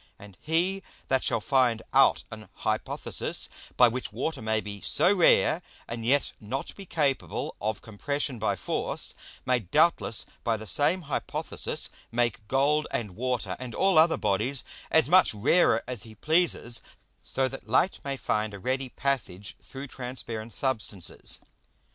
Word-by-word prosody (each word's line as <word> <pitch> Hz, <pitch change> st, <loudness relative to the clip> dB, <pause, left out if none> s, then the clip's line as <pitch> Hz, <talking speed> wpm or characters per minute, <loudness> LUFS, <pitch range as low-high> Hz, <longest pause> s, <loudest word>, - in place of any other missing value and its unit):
And 100 Hz, -2 st, -13 dB
he 175 Hz, +5 st, +1 dB, 0.3 s
that 130 Hz, -1 st, +2 dB
shall -, -, +1 dB
find 120 Hz, -1 st, +2 dB
out 135 Hz, 0 st, +5 dB
an 110 Hz, -1 st, -9 dB
Hypothesis, -, -, -2 dB, 0.3 s
by 125 Hz, -, +8 dB
which 125 Hz, +1 st, -3 dB
Water 130 Hz, +6 st, -3 dB
may 110 Hz, 0 st, +1 dB
be 100 Hz, -1 st, -7 dB
so 200 Hz, -, +5 dB
rare, 175 Hz, -2 st, +4 dB, 0.3 s
and 115 Hz, -1 st, -5 dB
yet 135 Hz, +5 st, +2 dB
not 125 Hz, +6 st, -4 dB
be 195 Hz, -2 st, -10 dB
capable 145 Hz, -6 st, -1 dB
of 110 Hz, +1 st, -2 dB
compression 130 Hz, +4 st, -2 dB
by 110 Hz, -, +1 dB
force, -, -, 0 dB, 0.3 s
may 125 Hz, -1 st, +3 dB
doubtless 120 Hz, -, +2 dB, 0.2 s
by 115 Hz, -2 st, +1 dB
the 110 Hz, -, -8 dB
same 155 Hz, -, +1 dB
Hypothesis 145 Hz, -2 st, -3 dB, 0.2 s
make 115 Hz, -3 st, 0 dB
Gold, 145 Hz, +4 st, +2 dB
and 105 Hz, -6 st, -3 dB
Water, 120 Hz, -6 st, -1 dB
and 125 Hz, -2 st, -6 dB
all 190 Hz, -4 st, +4 dB
other 165 Hz, +1 st, +5 dB
Bodies, 120 Hz, +7 st, 0 dB, 0.3 s
as 160 Hz, -, +4 dB
much 180 Hz, -7 st, +5 dB
rarer 170 Hz, -, +3 dB
as 125 Hz, -1 st, -4 dB
he 110 Hz, -1 st, -10 dB
pleases; 155 Hz, -, +1 dB, 0.4 s
so 130 Hz, 0 st, 0 dB
that 135 Hz, +1 st, -8 dB
Light 190 Hz, -, +2 dB
may 140 Hz, -1 st, -3 dB
find 105 Hz, -4 st, -1 dB
a -, -, -8 dB
ready 130 Hz, +4 st, -1 dB
passage 120 Hz, -9 st, -2 dB
through 135 Hz, +1 st, -8 dB
transparent 125 Hz, -4 st, -6 dB
Substances. 110 Hz, -9 st, -1 dB
130 Hz, 150 wpm, -28 LUFS, 110-145 Hz, 0.4 s, by